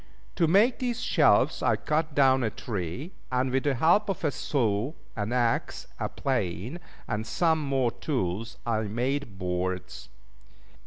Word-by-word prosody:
To 170 Hz, -, +3 dB
make 205 Hz, +9 st, +4 dB
these 245 Hz, -2 st, -1 dB
shelves 250 Hz, -, +3 dB
I -, -, +3 dB
cut 155 Hz, -1 st, -1 dB
down 135 Hz, -2 st, +5 dB
a 115 Hz, -, +1 dB
tree, 105 Hz, -, -5 dB, 0.2 s
and 130 Hz, +1 st, +1 dB
with 135 Hz, +2 st, 0 dB
the 140 Hz, -2 st, +2 dB
help 175 Hz, -, +3 dB
of 195 Hz, -, -3 dB
a 150 Hz, -, +2 dB
saw, 120 Hz, -1 st, 0 dB, 0.2 s
an 105 Hz, +1 st, -2 dB
axe, 120 Hz, -2 st, 0 dB
a -, -, -1 dB
plane, 120 Hz, -, -2 dB, 0.3 s
and 105 Hz, +1 st, -2 dB
some 160 Hz, +2 st, +2 dB
more 135 Hz, -4 st, +1 dB
tools, 115 Hz, -, -3 dB
I 115 Hz, -2 st, +1 dB
made 120 Hz, +1 st, -2 dB
boards. 90 Hz, -2 st, -3 dB
130 Hz, 150 wpm, -27 LUFS, 105-155 Hz, 0.3 s, down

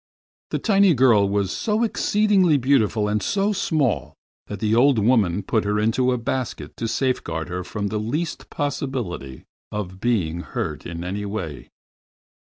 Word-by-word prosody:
The -, -, -1 dB
tiny 195 Hz, -5 st, +4 dB
girl 115 Hz, -6 st, +4 dB
was 100 Hz, -2 st, 0 dB
so 215 Hz, +1 st, 0 dB
exceedingly 205 Hz, -7 st, +3 dB
beautiful 115 Hz, -5 st, +2 dB
and 105 Hz, 0 st, 0 dB
so 200 Hz, -, +1 dB
small, 155 Hz, -, 0 dB, 0.3 s
that 105 Hz, -, -6 dB
the 110 Hz, +1 st, +1 dB
old 130 Hz, +2 st, +5 dB
woman 105 Hz, -4 st, +2 dB
put 110 Hz, -3 st, 0 dB
her 105 Hz, +1 st, 0 dB
into 115 Hz, +4 st, +2 dB
a 125 Hz, -, +1 dB
basket 125 Hz, +2 st, -4 dB
to 115 Hz, -, -2 dB
safeguard 110 Hz, -, -1 dB
her 90 Hz, +1 st, -3 dB
from 100 Hz, +2 st, -3 dB
the 105 Hz, -, -2 dB
least 145 Hz, +10 st, -3 dB
possibility 125 Hz, -, -4 dB, 0.3 s
of 95 Hz, -3 st, -5 dB
being 95 Hz, -8 st, 0 dB
hurt 75 Hz, -3 st, -4 dB
in 85 Hz, 0 st, -6 dB
any 100 Hz, +3 st, -3 dB
way. 90 Hz, -, -5 dB
110 Hz, 155 wpm, -23 LUFS, 100-140 Hz, 0.3 s, old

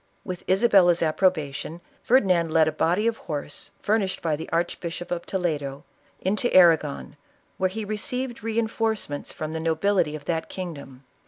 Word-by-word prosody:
With 180 Hz, -2 st, -6 dB
Isabella's 185 Hz, -4 st, +5 dB
ap 155 Hz, -1 st, 0 dB
probation, 160 Hz, -3 st, 0 dB, 0.2 s
Ferdinand 185 Hz, -10 st, +3 dB
led 160 Hz, -1 st, +4 dB
a -, -, +2 dB
body 175 Hz, +7 st, +1 dB
of 230 Hz, -1 st, +1 dB
horse 145 Hz, -2 st, -5 dB
furnished 205 Hz, -3 st, +1 dB
by 160 Hz, -3 st, +1 dB
the 160 Hz, -, -7 dB
Archbishop 170 Hz, +1 st, -2 dB
of 175 Hz, -1 st, -3 dB
Toledo, 150 Hz, -7 st, -2 dB, 0.4 s
into 210 Hz, +6 st, 0 dB
Arragon, 160 Hz, -5 st, +4 dB, 0.4 s
where 190 Hz, 0 st, +2 dB
he 220 Hz, +3 st, -5 dB
re 215 Hz, +1 st, -3 dB
ceived 250 Hz, +2 st, -3 dB
reinforcements 220 Hz, -7 st, -2 dB
from 155 Hz, 0 st, -5 dB
the 160 Hz, -, -2 dB
nobility 165 Hz, 0 st, +1 dB
of 145 Hz, -2 st, -9 dB
that 165 Hz, -2 st, -2 dB
king 185 Hz, -3 st, -5 dB
dom. 135 Hz, -2 st, -12 dB
175 Hz, 160 wpm, -25 LUFS, 155-205 Hz, 0.4 s, Isabella's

